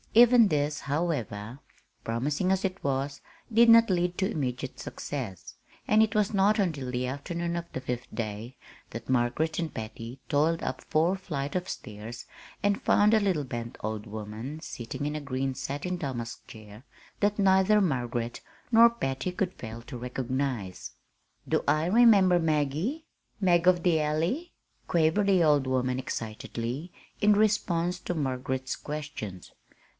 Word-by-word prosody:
Even 235 -2 +7
this, 150 -1 0
however, 135 -7 -2 0.4
promising 145 +11 0
as 190 +1 +1
it 190 0 -3
was, 140 0 -1 0.3
did 230 +1 +6
not 230 -1 +8
lead 180 -1 +1
to 190 - +1
immediate 130 -2 -3
success, 115 - -6 0.3
and 215 +1 +5
it 220 0 -1
was 210 0 +2
not 200 +2 +4
until 150 -10 -1
the 125 0 -1
afternoon 170 +6 -3
of 170 0 -5
the - - -4
fifth 125 -1 -5
day 110 +2 -5 0.3
that 115 +1 -8
Margaret 130 +6 +1
and 165 -2 -3
Patty 115 +3 -7
toiled 160 +3 +1
up - - -3
four 165 +5 +2
flights 150 -6 -4
of 185 +1 -2
stairs 110 +3 -7 0.4
and 205 0 +2
found 210 +1 +4
a 220 - +5
little 185 -7 +1
bent 120 -2 -6
old 110 0 -4
woman 110 +7 -6
sitting 125 -3 -6
in 150 +1 -2
a 155 - -3
green 135 -1 -2
satin 140 +7 -3
damask 125 -7 -5
chair 110 +1 -12 0.4
that 205 0 +2
neither 190 +2 +5
Margaret 120 - -1 0.3
nor 230 0 +8
Patty 135 -8 -3
could 185 0 -2
fail 115 0 -8
to 125 +1 -8
recognize. 125 -5 -3 0.6
"Do - - +1
I 155 +2 +3
remember 195 -3 +6
'Maggie'? 160 - 0 0.3
'Mag 175 -3 +3
of 175 -2 +4
the 165 -3 +3
Alley'?" 165 - -1 0.4
quavered 170 +5 +2
the 190 -3 +4
old 145 -4 +3
woman 130 0 0
excitedly 120 +5 -5 0.3
in 210 0 +6
response 180 -4 +1
to 180 - -3
Margaret's 130 -2 -2
questions. 145 - -7
150 Hz, 150 wpm, -28 LUFS, 125-185 Hz, 0.6 s, not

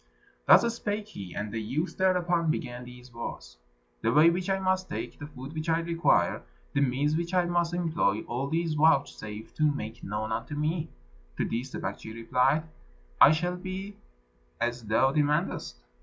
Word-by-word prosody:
Thus 235 -1 +7
spake 210 0 -3
he, 95 - -8
and 105 0 -3
the 115 - -2
youth 140 - -2
thereupon 175 -3 +2
began 125 -4 -3
these 125 0 -13
words: - - -7 0.4
"The - - +2
way 155 +3 +6
which 180 +2 -2
I 195 - +2
must 185 -1 0
take, 115 +3 -5
the 145 - -6
food 135 0 -9
which 155 +1 -3
I 165 +1 +3
require, 170 0 +2 0.3
the 145 - +2
means 140 +3 +1
which 170 +2 -2
I 180 -1 +4
must 175 -1 +1
employ, 160 - +1
all 125 +4 -3
these 165 +1 0
vouchsafe 140 -8 +1
to 155 -1 +3
make 110 -6 -6
known 105 +2 -3
unto 145 +6 -3
me." 155 +2 -1 0.5
To - - +1
this 120 +4 -3
the - - -6
Baktschi 110 0 -5
replied, 125 +6 +2 0.6
"It 155 - +9
shall 175 +2 -1
be 190 +2 -6 0.6
as 120 -1 -2
thou 110 +5 +3
demandest. 150 - 0
150 Hz, 170 wpm, -28 LUFS, 120-170 Hz, 0.6 s, It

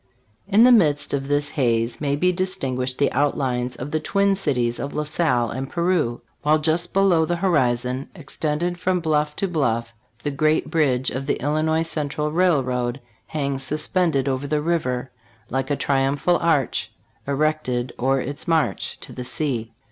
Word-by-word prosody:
1 200 - -3
In 220 - +8
the 250 - +7
midst 150 -10 +3
of 135 -1 -1
this 145 0 0
haze 115 -4 0
may 140 -1 +1
be 180 +5 +2
distinguished 135 -9 -2
the 140 - +2
outlines 125 -3 0
of 135 +4 -6
the 155 - +1
twin 200 +4 +2
cities 125 -11 0
of 140 - -5
La 150 - 0
Salle 145 -6 +1
and 130 +2 -4
Peru; 170 -9 0 0.2
while 150 +1 +3
just 165 +3 0
below 190 -4 +4
the 175 +2 0
horizon, 130 -7 0
extended 165 +2 -2
from 185 0 +1
bluff 150 -2 0
to 195 - -1
INTRODUCTORY. 190 - -4
bluff, 115 -6 0 0.3
the 145 - -1
great 155 +3 +1
bridge 135 -6 +2
of 135 +2 -4
the - - 0
Illinois 155 +3 +1
Central 150 -2 -2
Railroad 130 -8 +1 0.3
hangs 140 -3 -2
suspended 150 0 0
over 135 +1 -1
the 150 +1 +1
river, 130 -7 -1 0.4
Like 135 +2 -1
a 145 - +1
triumphal 140 +5 +1
arch 160 -6 0 0.4
Erected 140 -4 0
o'er 135 +2 +2
its 145 +6 -6
march 165 -2 0
To - - -8
the 125 - -6
sea. 125 -4 -3
145 Hz, 170 wpm, -23 LUFS, 130-165 Hz, 0.4 s, In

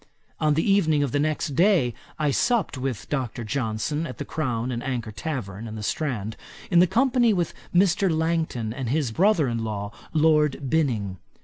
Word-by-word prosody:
On 150 -1 +2
the 160 - +1
evening 160 -7 +3
of 140 - -1
the 145 - +1
next 155 +2 0
day 170 - +4 0.2
I 150 -2 +1
supped 230 - +1
with 130 -3 -4
Dr. 130 -4 -3
Johnson, 130 +6 -2
at 125 - -8
the - - -5
Crown 125 -5 -2
and 120 -1 -3
Anchor 120 -5 -3
tavern, 110 -3 -5
in 110 - -7
the 105 - -6
Strand, 110 -5 -2 0.4
in 175 0 +7
company 240 +3 +3
with 175 -4 -1 0.2
Mr. 185 +1 +3
Langton 160 -9 -1
and 130 -2 -4
his 140 -3 0
brother 175 - +3
in 115 -2 -2
law, 100 -2 -4 0.2
Lord 150 -4 +2
Binning. 115 -12 0
145 Hz, 175 wpm, -25 LUFS, 115-160 Hz, 0.4 s, in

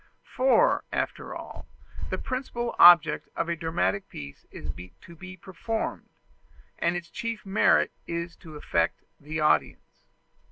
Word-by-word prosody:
For, 270 - +4
after - - -3
all, - - -9 0.4
the - - -2
principal 255 -2 -4
object 170 -3 +7
of - - -1
a 170 - 0
dramatic 170 +4 -1
piece 70 -1 -10
is 75 - -7 0.3
to 170 - -14
be 190 +2 -10
performed, 205 +5 -4 0.7
and 170 +1 +1
its 170 -1 -6
chief 230 -2 -5
merit 195 +2 +3 0.2
is 170 0 -4
to 160 -4 -12
affect 85 - -1 0.2
the 155 +2 -5
audience. 150 - 0
170 Hz, 130 wpm, -27 LUFS, 155-210 Hz, 0.7 s, object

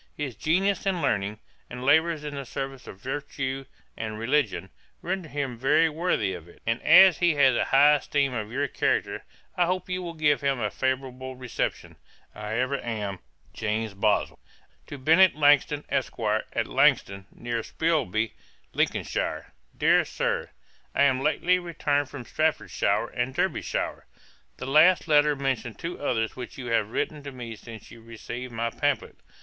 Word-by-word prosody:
'His 140 -6 -4
genius 195 +5 +1
and 190 -2 +1
learning, 105 -8 0 0.3
and 125 +1 -7
labours 160 +3 +3
in 150 -1 -5
the 140 -1 -5
service 135 0 -6
of - - -9
virtue 135 +1 -4 0.3
and 110 -1 -5
religion, 115 - 0 0.3
render 180 -2 -3
him 135 -4 -4
very 150 +5 +4
worthy 155 - 0
of 85 -2 -9
it; 85 - -17
and 115 +1 0
as 190 -2 +7
he 175 -3 +3
has 135 -3 +5
a - - +1
high 145 +2 +6
esteem 140 -1 0
of 110 -2 -4
your 140 +3 0
character, - - -1 0.3
I 175 -1 +2
hope 185 0 -2
you 180 0 -1
will 170 -2 -6
give 150 -2 +2
him 140 -2 0
a 105 -3 -1
favourable 130 0 -3
reception. 125 -2 -4 0.4
I 105 +1 -5
ever 130 +3 0
am, 105 -4 -3
&c. - - -36 0.3
'JAMES 110 0 -2
BOSWELL.' 100 - 0 0.5
'To 145 - -7
BENNET 165 +6 +5
LANGTON, 145 0 +3
ESQ., - - -2 0.4
AT - - 0
LANGTON, 100 0 +2
NEAR 120 -1 -3
SPILSBY, 120 - 0 0.4
LINCOLNSHIRE. - - -1 0.2
'DEAR - - +4
SIR, - - -2 0.5
'I - - +2
am 130 -2 +3
lately 180 +5 +2
returned 145 -5 -1
from 130 -4 -8
Staffordshire 155 +4 0
and 125 +2 -3
Derbyshire. - - -2 0.5
The - - -6
last 155 +7 +5
letter 150 -1 +4
mentions 130 -5 -2
two 170 +1 -5
others 115 -6 -1
which 125 -3 -8
you 125 -3 -5
have 110 -2 +1
written 150 +6 -2
to 140 -1 -7
me 120 -3 -7
since 110 +1 -12
you 115 - -13
received 120 +2 -7
my 115 0 -2
pamphlet. - - -1
135 Hz, 165 wpm, -26 LUFS, 115-150 Hz, 0.5 s, as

